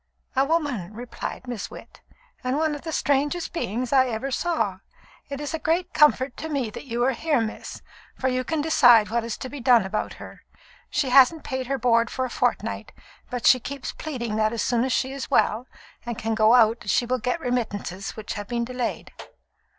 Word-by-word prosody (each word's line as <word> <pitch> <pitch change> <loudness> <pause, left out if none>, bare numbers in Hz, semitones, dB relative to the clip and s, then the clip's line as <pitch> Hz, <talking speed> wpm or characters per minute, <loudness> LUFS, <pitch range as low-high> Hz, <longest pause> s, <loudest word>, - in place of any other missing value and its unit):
"A 265 - +4
woman," 275 - -1
replied 245 +2 -6
Miss 240 -5 -4
Witt, - - -13 0.4
"and 255 +2 0
one 310 0 +1
of 290 - -6
the 325 - -5
strangest 290 +4 0
beings 250 - -2
I 260 -1 +5
ever 245 +3 -3
saw. 260 - -1 0.5
It 280 -1 -5
is 295 0 -4
a 320 - -2
great 335 +4 0
comfort 280 -4 +4
to 320 - -5
me 270 -7 -1
that - - -9
you 240 -2 -1
are 265 - +3
here, 295 +2 0
miss, 220 -1 -5 0.3
for 260 - -1
you 255 0 0
can 320 +2 -1
decide 245 -8 +5
what 235 0 +1
is 230 -1 -4
to - - -6
be 285 +2 -8
done 245 -4 +5
about 215 +3 -3
her. - - -11 0.5
She 270 - 0
hasn't 275 +4 +6
paid 260 -2 -4
her 275 +1 0
board 235 -2 +3
for 260 - -2
a 250 - -6
fortnight, - - -1 0.4
but 245 -1 -4
she 255 - +7
keeps 275 +2 -5
pleading 235 -8 -4
that 215 +1 +2
as 230 - -1
soon 240 -1 +1
as 260 - -1
she 260 +1 0
is 275 -2 -5
well, 230 +4 +2 0.4
and 235 -2 -5
can 225 0 -2
go 220 +1 +5
out, 225 -3 +3
she 240 - +3
will 255 +1 0
get 250 +8 -1
remittances 210 - -3
which 215 -1 -5
have 205 -2 -6
been 235 +1 -1
delayed." 250 -1 -4
250 Hz, 205 wpm, -25 LUFS, 230-280 Hz, 0.5 s, she